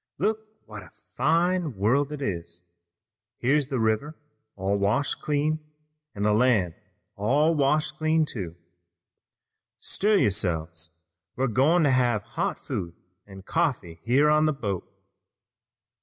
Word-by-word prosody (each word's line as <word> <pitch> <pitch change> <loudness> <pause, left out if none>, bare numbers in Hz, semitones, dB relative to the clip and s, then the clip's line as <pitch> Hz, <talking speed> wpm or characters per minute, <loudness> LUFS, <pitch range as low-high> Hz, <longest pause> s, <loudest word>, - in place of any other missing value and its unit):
"Look 220 0 -1 0.2
what - - -9
a - - -14 0.2
fine 170 -3 +1
world 130 +9 +2
it 145 -2 -5
is! 85 -5 -5 0.7
Here's 140 +3 +2
the 135 -3 -2
river 110 +8 0 0.4
all 95 +1 -1
washed 115 +8 0
clean, 150 +1 0 0.6
an' 100 - -3
the 105 0 +3
land 110 -7 +3 0.4
all 140 +11 +2
washed 150 +1 +1
clean, 155 0 +2
too! 95 - -6 1.2
Stir 210 +2 0
yourselves, 85 - -1 0.4
we're 130 - 0
goin' 135 +8 +3
to 145 - +4
have 120 -5 +2
hot - - -1
food 85 -1 -5 0.3
an' 95 -1 -11
coffee 115 - -1
here 130 - +3
on 150 +1 +4
the 155 - +2
boat. 100 -9 -4
130 Hz, 125 wpm, -26 LUFS, 100-150 Hz, 1.2 s, to